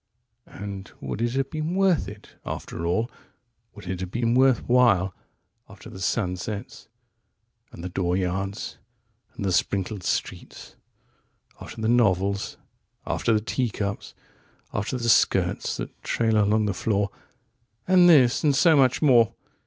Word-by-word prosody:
"99And 100 -1 -8
would - - -5
it 120 0 0
have 135 0 -1
been 155 +2 -3
worth 190 -4 +2
it, 105 0 -11
after 85 0 -5
all,100Would 115 +1 -6
it 90 0 -3
have 95 -1 -4
been 115 +3 0
worth 130 -1 +3
while,101After 110 -7 -1
the 95 - -10
sunsets 95 +1 -3 0.8
and 85 - -10
the 90 - -4
dooryards 95 +2 -2 0.6
and 100 - -4
the 95 - +1
sprinkled 95 +2 -1
streets,102After 110 +5 -8
the - - +1
novels, 100 -4 +1 0.5
after - - 0
the 110 -1 +2
teacups, 105 -4 -3 0.6
after 105 +5 -2
the 120 -1 -3
skirts 115 - +2
that - - -7
trail 110 -2 +1
along 105 +1 +2
the 100 - 0
floor 100 0 -1 0.8
103And 180 -1 +6
this, 130 -9 +5
and 145 -3 +3
so 160 +3 +5
much 130 0 +3
more? 120 -6 +4
110 Hz, 130 wpm, -25 LUFS, 95-125 Hz, 0.8 s, 103And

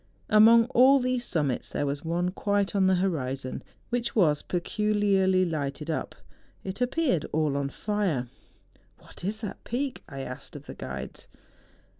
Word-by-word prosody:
Among 225 +2 +7
all 270 +2 +6
these 255 -1 0
summits 145 -7 -1
there 145 - -2
was 140 0 -3
one 175 +2 -1
quite 200 +1 0
on 190 -1 +4
the 190 - +4
horizon, 135 -8 -2 0.3
which 240 -1 -2
was 155 -9 +3
peculiarly 195 0 +1
lighted 150 -1 -3
up; 155 - -3 0.5
it 190 +5 -6
appeared 250 - +1
all 155 -2 +1
on 140 -1 -1
fire. 190 - -1 0.4
' - - -35
What - - -14
is 215 +4 -2
that 210 - -6
peak? 260 +3 -3
' - - -16
I 135 -2 -6
asked 135 +2 -8
of 145 -1 -9
the - - -8
guides. - - -7
185 Hz, 160 wpm, -27 LUFS, 150-215 Hz, 0.5 s, Among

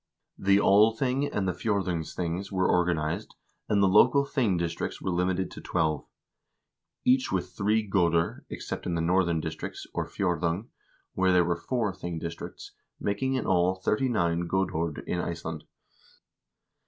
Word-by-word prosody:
The 100 0 +4
Althing 115 +7 +3
and 95 -2 -1
the - - +2
fjdrdungsthings 90 -2 -2
were 95 -1 +1
organized, 85 +2 0 0.3
and 100 -1 +3
the - - +5
local 125 +8 +5
thing 120 -10 +1
districts 85 -1 -3
were 95 - -2
limited 90 +1 0
to - - -9
twelve; 75 -2 -1 1.0
each 130 +1 +3
with 90 -1 -1
three 105 +4 +1
goder, 85 -4 +1
except - - -5
in 85 - -1
the 85 - 0
northern 85 -1 +2
district, 80 0 -5 0.2
or - - -2
fjdrdung, 90 +2 -1 0.4
where 95 0 +2
there 90 -1 +4
were 85 0 +1
four 105 +4 -1
thing 85 -3 -5
districts, 85 +1 -7 0.3
making 130 +7 -1
in 130 - -1
all 90 0 +3
thirty 105 +7 0
nine 85 -6 0
godord 85 -4 -1
in 90 - -2
Iceland. 80 -2 -4
95 Hz, 145 wpm, -28 LUFS, 85-105 Hz, 1.0 s, the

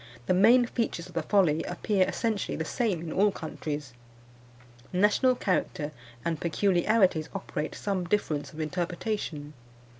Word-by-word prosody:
The - - +2
main 230 +7 +6
features 230 -8 -2
of - - -13
the 165 - 0
folly 165 -3 +3
appear 185 +2 +1
essentially 225 -4 -1
the 160 - -2
same 200 -3 -1
in 165 -2 -5
all 205 +2 +4
countries. 150 -5 -5 1.0
National 210 +7 +3
character 175 -7 -1 0.3
and 165 -2 -1
peculiarities 180 -1 +2
operate 150 - -4
some 195 -3 -2
difference 155 -7 -1
of 155 - -11
interpretation. 170 -2 -3
180 Hz, 130 wpm, -28 LUFS, 155-210 Hz, 1.0 s, main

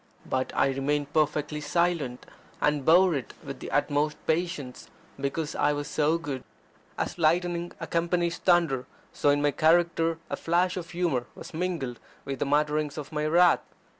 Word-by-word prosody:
But 130 0 -1
I - - +3
remained 145 +2 -1
perfectly 150 0 0
silent, 150 -4 0 0.3
and 150 -1 +1
bore 175 +4 +6
it 135 -5 -4
with - - -7
the - - -7
utmost 150 +1 +1
patience, 160 -6 -2 0.3
because 145 +3 -2
I 145 0 +2
was 145 0 -3
so 155 +2 +2
good. 145 -6 -5 0.5
As - - -3
lightning 175 +2 +1
accompanies 170 0 0
thunder, 165 -8 +2 0.3
so 145 - +2
in 145 0 +3
my 145 - +3
character 165 +1 +3
a - - -3
flash 175 +2 +1
of 175 -2 -5
humour 170 -9 -1
was - - -10
mingled 160 -8 -3 0.3
with 135 -1 -4
the - - 0
mutterings 150 +1 +1
of 150 -2 -6
my 150 0 -1
wrath. 175 +2 +5
155 Hz, 160 wpm, -27 LUFS, 145-170 Hz, 0.5 s, bore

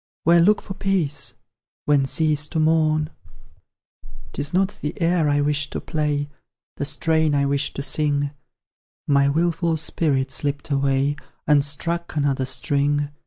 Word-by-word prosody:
Where 170 +1 +5
look 205 +5 +3
for 195 - -6
peace? 190 -7 -1 0.5
When 140 -2 +3
cease 150 -1 +1
to 160 - -2
mourn? 155 -1 +2 1.2
'Tis 145 0 -2
not 190 +2 0
the 150 +2 -4
air 165 -2 +2
I 145 0 +2
wished 145 0 0
to - - -2
play, 150 -2 -1 0.5
The 145 - -2
strain 160 0 +1
I 140 0 +2
wished 140 0 0
to 140 - -4
sing; 145 -1 0 0.8
My 140 -1 +4
wilful 165 +2 +1
spirit 140 -4 0
slipped 145 +2 -2
away 140 +1 +1 0.3
And 145 -2 +4
struck 170 +4 -3
another 140 -3 0
string. 145 +3 0
150 Hz, 140 wpm, -22 LUFS, 140-160 Hz, 1.2 s, Where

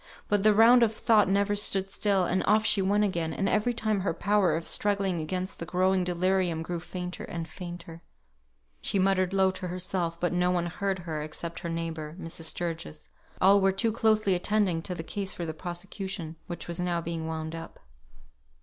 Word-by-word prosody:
But 205 -1 +2
the 215 +1 +5
round 230 +4 +7
of 220 -2 +3
thought 215 -4 +4
never 200 +1 +2
stood 195 -2 0
still; 195 -3 +1
and 185 +2 0
off 215 +1 +4
she 205 - +3
went 205 +2 +2
again; 170 -5 -1
and 195 - 0
every 215 +4 +2
time 215 -3 -1
her 185 -3 -1
power 200 -2 +2
of 165 +1 -3
struggling 195 -4 0
against 185 +4 -4
the 170 - -4
growing 185 +2 +2
delirium 180 -1 0
grew 175 +1 -4
fainter 180 +1 -6
and 165 -1 -5
fainter. 175 -2 -9 0.8
She - - +2
muttered 190 -1 +2
low 190 -1 +3
to 185 -1 -6
herself, 180 -1 -3
but 175 0 0
no 180 0 +2
one 175 -1 +1
heard 195 +3 -2
her 165 -4 -4
except 165 +2 -6
her 170 - -5
neighbour, 165 -2 -4
Mrs. 165 -1 -4
Sturgis; 160 - -4 0.3
all 195 +2 +6
were 195 0 +4
too 220 +4 0
closely 215 -3 +2
attending 185 -2 +1
to 180 +2 -3
the 165 - -5
case 195 +3 -2
for 175 - -5
the 160 - -4
prosecution, 175 0 -5
which 175 - -6
was 170 0 -3
now 175 -1 0
being 165 -1 -4
wound 160 0 -4
up. 165 0 -8
180 Hz, 195 wpm, -28 LUFS, 170-200 Hz, 0.8 s, round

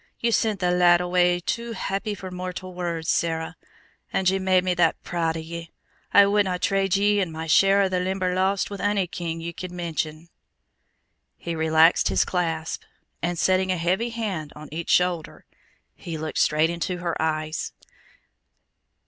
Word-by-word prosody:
Ye 235 - +1
sent 215 -3 +1
the 180 0 +2
lad 175 -1 +5
away 180 0 +2
too 235 +6 -3
happy 205 0 -3
for 185 -1 -8
mortal 185 0 -6
words, 170 -2 -3
Sarah. 160 -2 0 0.6
And 190 - 0
ye 195 - 0
made 185 -1 +3
me 185 -1 +1
that 175 -2 +2
proud 165 -2 -1
o' - - -4
ye! 165 +1 -7 0.4
I 200 - +7
wouldna 200 -2 +2
trade 195 0 +1
ye 205 +1 +3
an' 180 -4 -2
my 160 0 -5
share 195 +5 +5
o' - - +2
the 185 -1 -1
Limberlost 185 +1 0
with 200 - -6
ony 205 -2 +1
king 165 -1 -5
ye 170 +1 -5
could 185 +2 -7
mention." 165 -2 -4 1.1
He 170 - -5
relaxed 160 +1 +4
his - - +2
clasp, 165 -3 -2 0.4
and 175 0 -1
setting 185 +2 +2
a 185 - 0
heavy 185 +8 0
hand 200 -10 -4
on 150 0 -10
each 165 +2 -5
shoulder, 180 -3 +1 0.5
he 165 -2 -7
looked 155 0 -3
straight 155 +2 +3
into 170 +1 -3
her 175 -2 -2
eyes. 155 0 -2
180 Hz, 165 wpm, -24 LUFS, 165-190 Hz, 1.1 s, I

